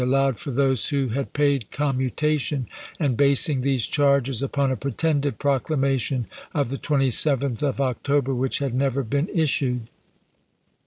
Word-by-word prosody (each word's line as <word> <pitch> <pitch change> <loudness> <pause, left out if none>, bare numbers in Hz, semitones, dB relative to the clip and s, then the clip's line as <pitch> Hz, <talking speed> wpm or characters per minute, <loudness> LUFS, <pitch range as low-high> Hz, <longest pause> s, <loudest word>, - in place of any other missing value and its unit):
allowed 135 0 +1
for - - -6
those 135 -2 +2
who 140 -4 0
had 135 +4 -3
paid 140 -6 +1
commutation, 140 0 -1 0.3
and 140 -6 +1
basing 140 +1 +2
these 130 -3 +1
charges 140 -4 +2
upon 140 0 0
a - - 0
pretended 140 -1 -1
proclama 135 0 +1
tion 125 0 -1 0.3
of 145 -5 +1
the 135 - -2
27th 135 -2 +1
of 140 -2 -1
October 135 +1 0
which 130 +1 0
had 140 -3 -2
never 135 +1 0
been 140 +7 -1
issued. 135 - 0
135 Hz, 145 wpm, -24 LUFS, 130-145 Hz, 0.3 s, those